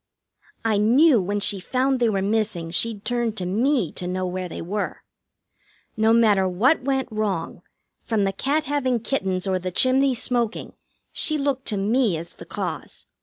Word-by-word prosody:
I 220 Hz, -2 st, +2 dB
knew 245 Hz, +4 st, +5 dB
when 205 Hz, +3 st, -1 dB
she 200 Hz, -1 st, 0 dB
found 260 Hz, +6 st, 0 dB
they 235 Hz, -2 st, +3 dB
were 195 Hz, -2 st, 0 dB
missing 200 Hz, -5 st, -1 dB
she'd 210 Hz, +4 st, 0 dB
turn 240 Hz, -2 st, 0 dB
to 185 Hz, -4 st, -5 dB
me 230 Hz, -, +1 dB
to 180 Hz, -, -5 dB
know 185 Hz, +1 st, -2 dB
where 185 Hz, 0 st, -4 dB
they -, -, -7 dB
were. 200 Hz, +5 st, -4 dB, 0.9 s
No 220 Hz, +1 st, +3 dB
matter 215 Hz, -5 st, +4 dB
what 245 Hz, -, +2 dB
went 265 Hz, 0 st, -1 dB
wrong, 205 Hz, -6 st, -2 dB, 0.4 s
from 220 Hz, -3 st, 0 dB
the 195 Hz, 0 st, 0 dB
cat 285 Hz, +9 st, 0 dB
having 260 Hz, -5 st, 0 dB
kittens 190 Hz, -8 st, -1 dB
or 190 Hz, -1 st, 0 dB
the 185 Hz, 0 st, -3 dB
chimney 260 Hz, +6 st, +2 dB
smoking, 235 Hz, -1 st, -2 dB, 0.4 s
she 310 Hz, -, -1 dB
looked 275 Hz, -2 st, -2 dB
to 210 Hz, -, -1 dB
me 210 Hz, -1 st, +1 dB
as 170 Hz, +2 st, -8 dB
the -, -, -12 dB
cause. -, -, -6 dB
220 Hz, 170 wpm, -23 LUFS, 190-255 Hz, 0.9 s, knew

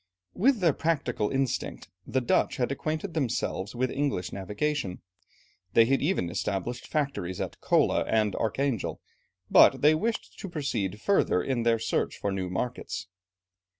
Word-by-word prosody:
With 245 Hz, +1 st, +3 dB
their 165 Hz, -5 st, +4 dB
practical 135 Hz, -10 st, 0 dB
instinct, 135 Hz, -2 st, -2 dB, 0.2 s
the 130 Hz, -, 0 dB
Dutch 120 Hz, -, +1 dB
had 125 Hz, +1 st, 0 dB
acquainted 155 Hz, +6 st, -3 dB
themselves 120 Hz, -, -2 dB
with 130 Hz, +1 st, 0 dB
English 135 Hz, -11 st, -1 dB
navigation. 105 Hz, +1 st, -2 dB, 0.7 s
They 115 Hz, -, +7 dB
had 135 Hz, +3 st, +2 dB
even 145 Hz, -, 0 dB
established 105 Hz, +7 st, -3 dB
factories 135 Hz, -, -2 dB
at -, -, -5 dB
Kola, -, -, +3 dB
and 110 Hz, -3 st, +1 dB
at -, -, -3 dB
Archangel, 120 Hz, +1 st, -1 dB, 0.5 s
but -, -, +6 dB
they 150 Hz, +1 st, +7 dB
wished 220 Hz, +9 st, -2 dB
to 195 Hz, -, -6 dB
proceed 115 Hz, -, -2 dB
further 105 Hz, -, +2 dB
in 130 Hz, -3 st, -1 dB
their 115 Hz, 0 st, +3 dB
search 115 Hz, +1 st, -1 dB
for 100 Hz, -, -2 dB
new 95 Hz, -2 st, -2 dB
markets. 90 Hz, -3 st, -4 dB
125 Hz, 150 wpm, -28 LUFS, 100-150 Hz, 0.7 s, They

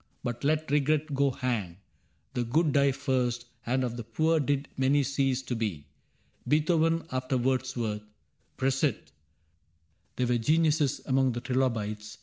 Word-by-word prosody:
But 120 Hz, +1 st, -4 dB
let 155 Hz, +1 st, +1 dB
regret 150 Hz, +1 st, +1 dB
go 140 Hz, 0 st, +3 dB
hang: 120 Hz, -10 st, -2 dB, 0.6 s
the 125 Hz, -, 0 dB
good 150 Hz, +7 st, +2 dB
Die 140 Hz, -1 st, +4 dB
first, 130 Hz, -3 st, -1 dB, 0.2 s
and 130 Hz, +2 st, +1 dB
of 120 Hz, -1 st, -3 dB
the 120 Hz, -, -4 dB
poor 155 Hz, +9 st, +1 dB
did 140 Hz, 0 st, 0 dB
many 135 Hz, +2 st, +3 dB
cease 135 Hz, -1 st, 0 dB
To 125 Hz, -, -3 dB
be. 105 Hz, -10 st, -3 dB, 0.6 s
Beethoven 165 Hz, +2 st, +2 dB
after 130 Hz, 0 st, -1 dB
Wordsworth. 120 Hz, -4 st, -1 dB, 0.6 s
Prosit! 135 Hz, 0 st, 0 dB, 1.0 s
There 125 Hz, -, 0 dB
were 120 Hz, -1 st, +1 dB
geniuses 155 Hz, +2 st, +2 dB
among 130 Hz, -1 st, +2 dB
the 120 Hz, -, -4 dB
trilobites. 110 Hz, -5 st, -2 dB
130 Hz, 135 wpm, -28 LUFS, 120-145 Hz, 1.0 s, Die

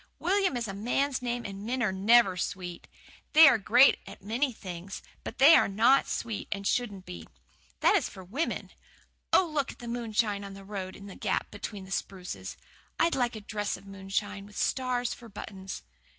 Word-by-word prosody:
"William 375 Hz, -5 st, +1 dB
is 235 Hz, -2 st, -2 dB
a 195 Hz, -, -5 dB
man's 250 Hz, +6 st, 0 dB
name, 240 Hz, -1 st, -3 dB
and 195 Hz, 0 st, -6 dB
men 245 Hz, +3 st, -1 dB
are 210 Hz, -, +2 dB
NEVER 200 Hz, +1 st, +5 dB
sweet. 180 Hz, -1 st, -5 dB, 0.5 s
They 320 Hz, +1 st, +10 dB
are -, -, +7 dB
a 225 Hz, -, +1 dB
great 245 Hz, +7 st, +6 dB, 0.2 s
many 230 Hz, +8 st, 0 dB
nice 245 Hz, -, -10 dB
things, 185 Hz, +1 st, -7 dB, 0.2 s
but -, -, -7 dB
they 280 Hz, +5 st, +8 dB
are -, -, +6 dB
NOT 230 Hz, +7 st, +4 dB
sweet 225 Hz, -3 st, -3 dB
and 200 Hz, 0 st, -3 dB
shouldn't 205 Hz, -5 st, -1 dB
be. 85 Hz, -2 st, -9 dB, 0.5 s
That -, -, +5 dB
is -, -, +1 dB
for 190 Hz, -, -11 dB
women. 255 Hz, -, -3 dB, 0.6 s
Oh, 375 Hz, -, +5 dB
look 300 Hz, -4 st, -1 dB
at -, -, -22 dB
the 240 Hz, -, -9 dB
moonshine 225 Hz, -3 st, -1 dB
on 195 Hz, -1 st, -8 dB
the 195 Hz, 0 st, -11 dB
road 190 Hz, -2 st, -5 dB
in 200 Hz, -, -11 dB
that 195 Hz, -, -10 dB
gap -, -, -1 dB
between 205 Hz, -1 st, -7 dB
the 190 Hz, -, -13 dB
spruces! 185 Hz, -2 st, -5 dB, 0.4 s
I'd 335 Hz, -, +3 dB
like 245 Hz, -2 st, 0 dB
a 215 Hz, -, -7 dB
dress 205 Hz, 0 st, -3 dB
of -, -, -16 dB
moonshine, 195 Hz, +1 st, -4 dB
with 205 Hz, -, -13 dB
stars 250 Hz, -2 st, 0 dB
for 235 Hz, -1 st, -12 dB
buttons." 195 Hz, -2 st, -8 dB
210 Hz, 195 wpm, -29 LUFS, 195-245 Hz, 0.6 s, They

